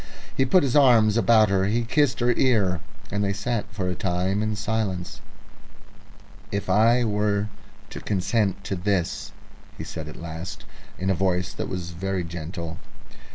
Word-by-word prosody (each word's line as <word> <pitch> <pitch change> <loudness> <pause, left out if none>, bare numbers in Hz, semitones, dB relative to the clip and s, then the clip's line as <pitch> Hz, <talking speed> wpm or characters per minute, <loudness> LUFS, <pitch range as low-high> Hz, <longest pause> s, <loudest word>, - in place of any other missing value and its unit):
He 135 - +3
put 180 +6 +4
his 135 -2 0
arms 120 -7 +6
about 110 -1 +5
her, 95 -1 +2
he 115 +4 +1
kissed 135 +2 +1
her 120 0 +4
ear, 105 -9 +2 0.3
and 100 +1 0
they 100 0 0
sat 105 +2 -2
for 100 -3 -3
a 90 - 0
time 95 +2 -1
in 110 0 -1
silence. 105 -4 -2 1.3
"If 100 -2 -2
I 115 +5 +4
were 105 -1 0 0.4
to - - -6
consent 100 0 0
to 100 - -3
this?" 90 -1 -1 0.5
he - - -5
said 80 -2 -6
at 75 - -8
last, 85 +2 -7 0.3
in 95 +1 0
a - - +4
voice 90 -1 0
that - - -4
was 90 -2 -4
very 95 +1 -2
gentle. 85 0 -6
100 Hz, 160 wpm, -25 LUFS, 90-110 Hz, 1.3 s, arms